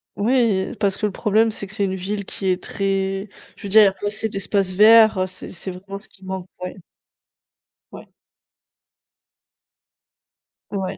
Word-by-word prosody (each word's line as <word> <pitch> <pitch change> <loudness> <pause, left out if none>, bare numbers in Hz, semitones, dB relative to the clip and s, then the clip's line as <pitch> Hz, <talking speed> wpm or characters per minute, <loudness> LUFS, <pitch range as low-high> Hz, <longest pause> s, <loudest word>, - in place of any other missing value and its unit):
Oui, 225 -2 +1
parce 200 -3 +1
que 210 - 0
le - - -4
problème 215 +3 +2
c'est 210 -2 -6
que 195 - -8
c'est 205 -2 0
une 190 0 -2
ville 200 +2 -4
qui 195 - -7
est 185 -1 +1
très 195 0 -2 0.3
je - - -16
veux 200 - -5
dire 215 +2 +7
il - - +7
y - - +6
a 195 - 0
pas 200 - -8
assez 215 +2 0
d'espace 195 -1 -1
vert, 215 -1 +6
c'est 185 - -6
c'est 190 +1 -6
vraiment 195 +2 -8
ce 200 - -12
qui 190 - -21
manque, 190 -1 -5 0.2
ouais. 180 - -5 1.2
Ouais. - - -13 2.6
Ouais. 195 -2 -3
195 Hz, 175 wpm, -21 LUFS, 190-210 Hz, 2.6 s, dire